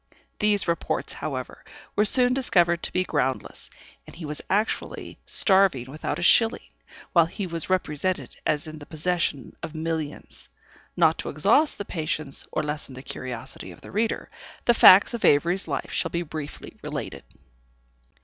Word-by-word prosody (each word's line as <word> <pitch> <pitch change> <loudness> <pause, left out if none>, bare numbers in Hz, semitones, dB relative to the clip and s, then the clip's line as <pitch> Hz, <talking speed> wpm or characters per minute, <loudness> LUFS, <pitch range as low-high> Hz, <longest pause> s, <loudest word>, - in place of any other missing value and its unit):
These 210 -2 +2
reports, 170 0 -1
however, - - -6 0.3
were 210 - +3
soon 250 +2 +5
discovered 175 -10 +2
to - - -2
be 185 - +1
groundless, 135 -7 -2 0.4
and - - -12
he 165 -1 -7
was 150 0 -5
actually 210 +3 -2
starving 190 - +3
without 155 - -3
a - - -4
shilling, 225 +6 +3 0.4
while 170 -2 +5
he 200 +3 -5
was 170 -1 -4
represented 185 -1 -1
as 150 -1 0
in 155 0 -9
the 145 - -12
possession 160 -5 -2
of 160 -1 -7
millions. 160 -2 -5 0.5
Not - - +4
to - - -4
exhaust 310 0 +3
the 205 - -5
patience, 155 -5 -3
or - - -1
lessen 150 -3 -4
the 130 - -9
curiosity 130 0 -6
of - - -14
the - - -11
reader, 220 +3 -1 0.3
the 240 - +5
facts 200 -1 +8
in 235 - -4
Avery's 170 +6 +3
life 140 -3 -3
shall - - -1
be 170 +1 -2
briefly 155 -2 -8
related. - - -6
170 Hz, 160 wpm, -25 LUFS, 150-195 Hz, 0.5 s, facts